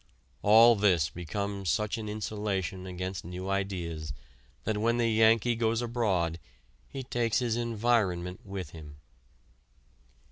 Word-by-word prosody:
All 115 +3 +7
this 90 -8 +2
becomes 100 +3 -4
such 105 +8 0
an 105 -1 -5
insulation 105 -3 -3
against 90 +1 -5
new 90 +3 -5
ideas 85 -7 -3 0.5
that 110 -1 -1
when 115 +2 +2
the 120 -1 +2
Yankee 115 +1 +4
goes 115 0 +1
abroad 100 -9 0 0.5
he 135 - -6
takes 120 -3 0
his 120 -3 0
environment 110 -6 0
with 95 -5 -6
him. 75 -3 -11
100 Hz, 120 wpm, -29 LUFS, 90-115 Hz, 0.5 s, All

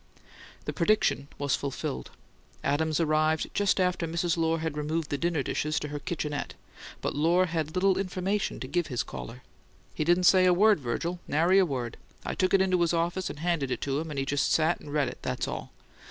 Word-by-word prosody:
The - - -3
prediction 175 -6 +2
was 145 -2 +1
fulfilled: 125 - -4 0.5
Adams 155 +3 +1
arrived 155 0 +1
just 205 -1 +2
after 180 -2 +1
Mrs. 170 +1 0
Lohr 165 -1 +1
had 160 -2 -3
removed 150 +1 -2
the 145 - 0
dinner 170 -4 0
dishes 155 +4 -1
to 150 - -5
her 145 0 -4
"kitchenette"; 150 -4 -4 0.5
but - - -2
Lohr 170 +5 +3
had 160 -2 -3
little 190 +1 +3
information 195 +2 -1
to - - -4
give 175 -2 0
his 125 -5 -1
caller. 125 +2 -8 0.5
"He - - -1
didn't 175 +3 +3
say 185 +1 +6
a 180 -1 +5
word, 210 0 +5
Virgil; 155 +8 -3
nary 170 +6 +4
a 190 - +4
word. 125 -5 -4 0.3
I - - -2
took 185 0 +2
it 195 - +4
into 185 -2 +2
his 170 0 +2
office 170 +2 -1
and - - -7
handed 165 -6 0
it - - -2
to 140 0 -1
him, 160 +1 -5
and 150 - -6
he 135 - 0
just 145 +1 +1
sat 160 +2 +2
and 145 - -10
read 145 -2 +1
it; - - -7
that's - - -2
all. - - -5
165 Hz, 210 wpm, -28 LUFS, 145-180 Hz, 0.5 s, say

